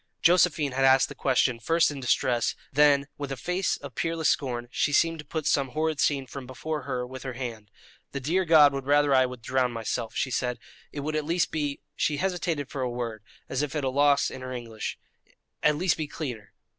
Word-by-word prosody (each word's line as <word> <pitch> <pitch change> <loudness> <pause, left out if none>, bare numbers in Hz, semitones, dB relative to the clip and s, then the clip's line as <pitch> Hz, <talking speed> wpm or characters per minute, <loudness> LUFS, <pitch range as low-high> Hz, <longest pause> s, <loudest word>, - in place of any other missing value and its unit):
Josephine 165 -4 +4
had 135 +1 0
asked 135 0 +5
the - - -7
question 125 -2 +1
first 165 +7 +2
in 145 - -6
distress; 125 -1 +1 0.2
then, 145 0 +4
with 140 -1 -4
a 135 - -3
face 180 +7 -1
of 140 -2 -10
peerless 165 0 0
scorn, 120 -4 -1
she 145 - +1
seemed 165 +3 +2
to 150 - -8
put 155 +1 -4
some 135 -3 +1
horrid 155 -1 0
scene 140 -2 +1
from 130 -1 -8
before 150 +4 -4
her 125 -1 -2
with 130 +1 -9
her 130 -1 -5
hand. 115 -4 -6 0.4
"The 140 - -3
dear 165 +8 +1
God 155 -4 +6
would 135 -1 -4
rather 145 0 +4
I 130 -1 +5
would 125 -2 -10
drown 125 0 +1
myself," 115 0 -3
she 130 - -1
said; 125 0 -1 0.3
"it 145 - -5
would 155 +2 -3
at 155 - 0
least 170 +3 0
be" 145 -3 -2
she 150 - 0
hesitated 170 -5 -1
for 140 - -5
a 125 - 0
word, 120 -3 -4 0.3
as 130 - -1
if 150 0 -3
at 150 - -1
a 135 - +1
loss 140 +1 +3
in 130 - -8
her 130 0 -6
English 115 -3 -5 0.6
"at 150 0 +3
least 180 +2 +1
be 155 -2 -3
cleaner." 120 -10 -6
140 Hz, 220 wpm, -27 LUFS, 125-155 Hz, 0.6 s, God